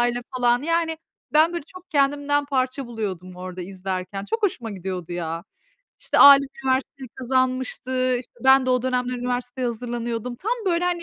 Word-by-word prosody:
aile 240 0 +1
falan, 245 0 +3
yani 330 0 0 0.3
ben 315 +3 +5
böyle 340 -4 -4
çok 370 +1 -14
kendimden 290 0 +2
parça 265 -1 -1
buluyordum 190 -6 -5
orada 185 0 -6
izlerken. 190 +1 -5
Çok 450 - -3
hoşuma 345 - -1
gidiyordu 185 -3 -5
ya. 165 0 -4 0.6
İşte, - - 0
Alim 280 -1 +9 0.2
üniversiteyi 265 0 -1
kazanmıştı. 255 0 0
İşte, 245 - -10
ben 265 0 +6
de 255 - +2
o 250 -1 +2
dönemler 250 -1 0
üniversiteye 245 +1 -2
hazırlanıyordum. 240 0 -4
Tam 425 - -2
böyle 350 -1 +2
hani, 350 -1 0
255 Hz, 160 wpm, -23 LUFS, 225-280 Hz, 0.6 s, Alim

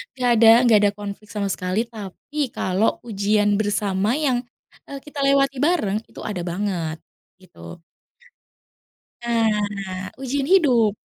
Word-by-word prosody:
nggak 250 -1 0
ada 225 0 +5 0.2
nggak 225 -3 +6
ada 205 -1 +3
konflik 205 0 -7
sama 200 -2 -2
sekali, 185 +2 -2
tapi 215 +8 -10 0.2
kalau 185 +4 +1 0.2
ujian 205 0 +1
bersama 205 -1 0 0.2
yang, 255 -3 +2 0.5
eee, 280 - -6
kita 295 -1 -8
lewati 275 -1 +2
bareng 285 - +1
itu - - -13
ada 180 -4 -4
banget, 175 -4 -3 0.4
gitu. 85 - -13 1.4
Nah 205 -5 -1
ujian 270 +1 -2
hidup 255 - +4
210 Hz, 125 wpm, -22 LUFS, 195-245 Hz, 1.4 s, nggak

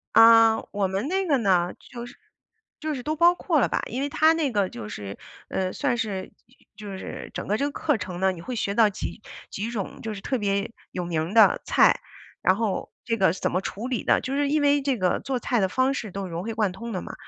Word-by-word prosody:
啊， 225 0 +8 0.2
我 200 -1 0
们 195 - -2
那 385 0 0
个 285 -4 +3
呢， 180 -5 +2 0.2
就 240 -1 -6
是 245 - -12 0.6
就 310 -2 -2
是 250 - -6
都 310 0 -2
包 345 +2 +6
括 330 -4 +1
了 - - +3
吧， - - -1
因 250 +4 -4
为 285 - 0
它 315 +2 +4
那 320 -4 +1
个 205 -5 0
就 105 -3 -8
是， 100 -1 -7 0.3
呃， 185 -1 -1
算 255 -4 0
是 200 -4 -3 0.5
就 210 -1 -9
就 195 -1 -6
是 - - -7
整 - - -4
个 210 - +2
这 280 - 0
个 290 - -2
课 295 -6 +1
程 180 -2 -6
呢， 190 0 +3
你 170 -2 -8
会 250 +6 -5
学 200 -2 -1
到 220 0 +5
几 205 +1 -6 0.3
几 215 +4 -4
种 210 -5 -5
就 220 - -4
是 195 - -8
特 260 - -1
别 200 +1 -1 0.2
有 180 - -3
名 170 +2 -2
的 225 - +6
菜， - - +4 0.4
然 185 - +4
后 210 -4 -2
这 230 -1 -1
个 190 -4 +3
是 - - -9
怎 - - 0
么 185 - +1
处 215 +5 -5
理 250 - -2
的。 - - +3
就 265 - -4
是 285 0 +1
因 300 +1 +2
为 285 0 +3
这 270 -3 0
个 185 -2 +1
做 265 -2 -2
菜 245 -1 0
的 190 - +2
方 260 +6 +1
式 220 -6 -4
都 195 +1 -4
融 170 +2 -4
会 225 +1 -4
贯 215 -4 +1
通 230 +4 -7
的 185 - -2
嘛， - - -8
225 Hz, 270 characters per minute, -25 LUFS, 190-265 Hz, 0.6 s, 啊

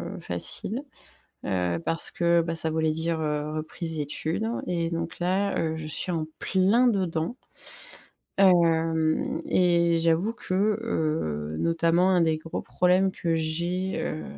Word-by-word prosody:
heu, - - -8
facile, 195 - -2 0.6
heu, 90 -2 0
parce 165 - +2
que, 170 0 +3
bah, 165 0 -3
ça 160 0 0
voulait 160 0 +1
dire, 160 +1 -2
heu, 150 -1 -2
reprise 160 +1 -4
études 155 +8 -2 0.2
et 170 -2 -1
donc 165 0 -4
là, 190 +3 0
heu, 160 -1 -1
je 160 -1 -6
suis 180 +4 0
en 160 -2 -1
pleindedans. 190 -2 +2 1.0
Hem 165 -4 +3
et 170 -2 +3
j'avoue 165 +6 +2
que, 230 - -6 0.3
heu, 115 - -2
notamment 170 +2 +2
un 180 -2 +4
des 160 -1 +2
gros 160 +1 -5
problèmes 185 +1 +2
que 170 -3 -1
j'ai, 170 +4 -1
heu, 155 - -3
165 Hz, 140 wpm, -26 LUFS, 160-180 Hz, 1.0 s, un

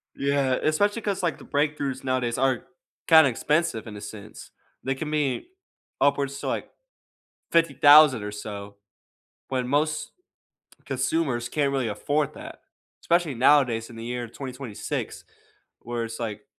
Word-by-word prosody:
Yeah, 140 -2 +1
especially 205 +9 +1
'cause, 200 -3 -2
like, 175 -4 -1
the - - -14
breakthroughs 145 -2 -1
nowadays 130 -3 -1
are 130 -2 0 0.4
kinda 160 -4 +7
expensive 150 0 0
in 105 -2 -8
a - - -9
sense. 105 0 -10 0.3
They 135 +1 -1
can 150 +3 -5
be 150 - -1 0.5
upwards 140 -1 +1
to, - - -5
like, - - -3 0.8
$50,000 150 -6 +6
or 105 0 -5
so, 100 -1 -7 0.7
when 130 -2 -1
most 150 +2 0 0.7
consumers 135 -8 -1
can't 140 -1 0
really 135 -3 0
afford 145 +8 -1
that. - - -10 0.4
Especially 170 -3 +1
nowadays 125 -3 +3
in 120 - -11
the 115 - -8
year 120 0 -4
2026, 130 -2 -6 0.6
where 120 0 -4
it's 115 0 -7
like 105 -3 -5
135 Hz, 135 wpm, -25 LUFS, 120-150 Hz, 0.8 s, kinda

